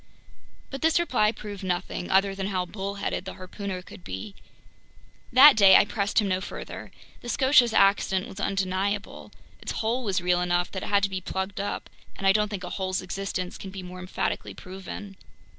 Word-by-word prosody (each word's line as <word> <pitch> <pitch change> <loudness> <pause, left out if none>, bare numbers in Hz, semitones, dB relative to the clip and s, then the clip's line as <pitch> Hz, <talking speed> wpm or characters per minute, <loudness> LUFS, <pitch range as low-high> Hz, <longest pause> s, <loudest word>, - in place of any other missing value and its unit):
But 270 - -6
this 320 +1 +3
reply 240 -11 +2
proved 205 -3 -8
nothing, 180 -1 -3
other 195 +1 +3
than 195 0 -3
how 185 -2 -1
bullheaded 200 0 -4
the 190 - -7
harpooner 185 0 -6
could 180 - -13
be. 205 +2 -6 1.0
That 270 +3 +9
day 195 -3 +8
I - - +7
pressed 205 0 -2
him 210 - +1
no 185 -1 0
further. - - -7 0.3
The 240 - -7
Scotia's 260 -2 +4
accident 195 -2 +3
was 195 - -10
undeniable. 195 +1 -2 0.3
Its - - -4
hole 235 +3 -1
was 195 -4 0
real 180 0 +1
enough 175 0 0
that 190 - -4
it - - -5
had 200 -1 +3
to 200 - +2
be 190 -1 -3
plugged 190 +2 -4
up, 200 - -3 0.3
and 195 - -6
I 195 - +7
don't 210 +1 +2
think 200 -3 -5
a 180 - -5
hole's 185 -1 -2
existence 185 0 -4
can 195 - -7
be 190 -1 -8
more 180 0 -9
emphatically 180 0 -3
proven. 190 +1 -9
195 Hz, 190 wpm, -26 LUFS, 185-210 Hz, 1.0 s, That